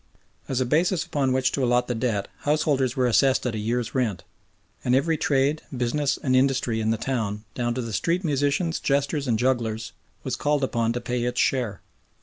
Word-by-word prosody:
As 130 - 0
a 130 - +1
basis 170 +7 +1
upon 135 -3 0
which 130 0 +2
to 135 - -1
allot 120 0 +2
the 125 - -1
debt 110 -4 -1
householders 145 -4 +1
were 130 -2 +2
assessed 130 +3 +3
at 125 - -1
a 110 - -3
year's 115 +2 -2
rent, 115 -8 -1 0.6
and 125 - +2
every 160 +5 +2
trade, 145 +1 +1 0.2
business, 135 +4 0
and 130 -2 +2
industry 130 -4 +2
in 110 - 0
the 115 - +1
town, 110 -4 -2
down 120 -1 -1
to 125 - -2
the 115 -2 -5
street 170 - 0
musicians, 145 +2 0
jesters, 140 +1 0
and 115 -3 +2
jugglers, 115 -3 -1 0.3
was - - -2
called 145 -1 0
upon 115 -3 0
to 120 - -3
pay 125 -1 -2
its 125 0 -1
share. 120 -7 0
130 Hz, 195 wpm, -25 LUFS, 120-140 Hz, 0.6 s, assessed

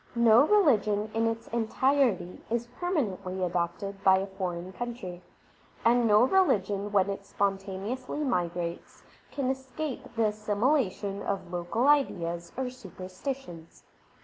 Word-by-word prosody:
No 235 +4 +6
religion 215 - +3
in 225 0 +1
its 225 0 -3
entirety 235 -4 +1
is 235 +1 -1
permanently 200 - -1
adopted 180 +3 -2
by 190 -1 +6
a 190 - -1
foreign 185 -2 -5
country; 215 -8 -6 0.6
and 235 0 +4
no 210 +1 +6
religion 205 - +2
when 195 -2 +3
it 200 0 -4
spontaneously 200 +8 -2
migrates 175 - -3 0.3
can 265 -2 0
escape 265 +2 -5
the 225 -1 +2
assimilation 210 -1 0
of 195 -3 -3
local 175 +9 0
ideas 170 -12 +1
or 260 -1 -2
super 190 -8 -11
stitions. 185 - -7
210 Hz, 120 wpm, -28 LUFS, 185-255 Hz, 0.6 s, No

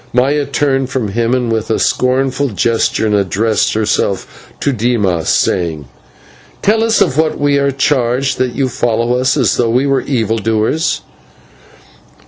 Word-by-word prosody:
Maya 140 +3 +1
turned 135 -2 0
from 130 -6 -2
him 120 +3 0
with 110 -1 -2
a 110 - +1
scornful 135 +2 0
gesture, 115 +1 0
and 105 - 0
addressed 105 +3 +1
herself 100 -3 -2
to 140 - 0
Dimas, 105 - 0
saying: 80 -5 0 0.8
"Tell 220 +2 +2
us 225 -1 +2
of 135 - +2
what 160 -1 0
we 145 -1 +2
are 140 0 +1
charged 135 -1 0
that 125 -2 -1
you 135 - 0
follow 120 -1 0
us 130 +3 +1
as 125 -6 +1
though 120 -2 +1
we 125 +4 +1
were 135 -1 +1
evil 115 -4 -1
doers." 110 - 0
125 Hz, 150 wpm, -14 LUFS, 110-135 Hz, 0.8 s, Tell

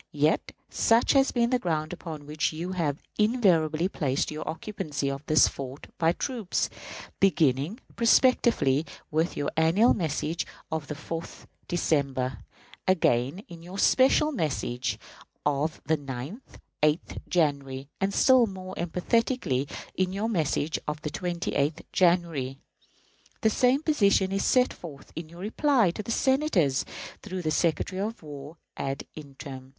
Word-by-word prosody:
Yet 150 +2 +2 0.2
such 230 +1 +3
has 270 -1 +4
been 235 -1 +1
the 250 - +3
ground 155 -5 -1
upon 160 -4 -7
which 150 +1 -1
you 170 +4 -4
have 155 -6 -2 0.2
invariably 180 -8 +3
placed 145 -8 -1
your 155 - -5
occupancy 155 -6 -3
of 135 +1 -6
this 155 - +6
fort 135 +1 -8
by 165 0 +4
troops; 230 -3 -2 0.5
beginning, 160 - +2 0.2
prospectively, 230 - +4 0.3
with 160 +3 0
your 145 0 -1
annual 165 +9 +4
message 160 -1 -2 0.2
of 160 -2 -3
the 150 - -4
4th 165 +2 -7 0.2
December; 135 -7 0 0.5
again 160 - +2
in 170 -2 -11
your 180 +3 -9
special 265 +7 +4
message 135 - -2 0.5
of 145 +2 0
the 160 +2 +2
9th 140 - -8 0.2
(8th) 150 +3 +1
January, 140 -5 0
and 195 +1 +1
still 255 +3 +5
more 185 -1 -7
emphatically 175 - 0 0.3
in 185 -1 0
your 205 +4 -1
message 160 -5 0
of 150 0 -2
the 150 - -3
28th 170 -3 -1
January. 170 -7 +2 0.8
The 220 - +3
same 255 +6 +3
position 200 -11 +3
is 195 0 0
set 255 0 +3
forth 150 -6 -11
in 160 -1 -6
your 170 +2 -11
reply 230 - +2
to 195 - -5
the 210 - -10
Senators, 230 - +2 0.4
through 185 -3 -5
the 155 - 0
Secretary 175 +4 0
of 220 -1 -4
War 145 +1 -9 0.2
ad 135 0 -3
interim. 135 -3 -9
165 Hz, 140 wpm, -27 LUFS, 145-200 Hz, 0.8 s, this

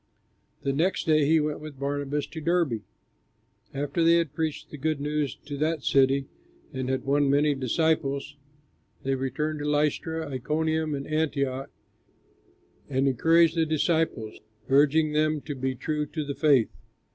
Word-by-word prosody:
The 135 - 0
next 170 +7 0
day 155 -2 +3
he 160 +1 +5
went 150 0 -2
with 150 -2 -9
Barnabas 145 +1 -2
to 160 - -8
Derbe. 165 -9 +1 0.9
After 145 +4 -1
they 165 +1 +6
had 165 -4 +1
preached 160 -1 -3
the 150 - -7
good 155 +1 -1
news 145 -3 -1
to 145 -1 -5
that 155 0 -1
city 135 0 +3 0.5
and 130 -1 -3
had 130 +1 -1
won 140 0 +2
many 145 +1 +3
disciples, 140 +1 0 0.7
they 135 - 0
returned 140 +4 -2
to 145 - -4
Lystra, 155 +2 0
Iconium, 155 +3 -1
and 140 0 -5
Antioch, 140 -4 -1 1.2
and 135 0 +1
encouraged 165 +5 +4
the 165 - +3
disciples 155 -7 0 0.3
urging 150 +3 +4
them 155 0 +2
to 150 - -5
be 130 -1 -2
true 150 +3 -2
to 155 0 -4
the 140 - -3
faith. 140 -6 +3
150 Hz, 150 wpm, -26 LUFS, 135-155 Hz, 1.2 s, they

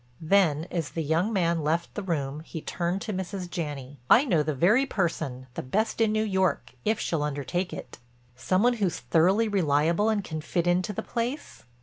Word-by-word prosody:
Then 160 -3 +3
as 165 -4 -2
the 165 - -3
young 165 +8 +1
man 170 -5 +1
left 165 +3 -1
the 205 - -4
room 150 -6 -2
he 160 +1 -7
turned 175 +4 -2
to 215 - -4
Mrs. 185 0 -4
Janney. 145 -6 -5
"I 260 - +7
know 175 - +2
the 150 0 -1
very 210 - +4
person, 160 - -2
the - - -4
best 215 - -1
in 220 -1 +3
New 215 0 +1
York, 190 - 0
if 220 0 +1
she'll 165 -3 -1
undertake 150 +5 -2
it." - - -8 0.4
"Some 155 - +1
one 245 +1 +4
who's 195 -6 0
thoroughly 180 - +3
reliable 170 +1 +2
and 210 -2 0
can 155 -3 -5
fit 170 +2 -1
into 180 +3 +1
the 205 - -4
place?" 240 - -4
175 Hz, 195 wpm, -27 LUFS, 155-200 Hz, 0.4 s, I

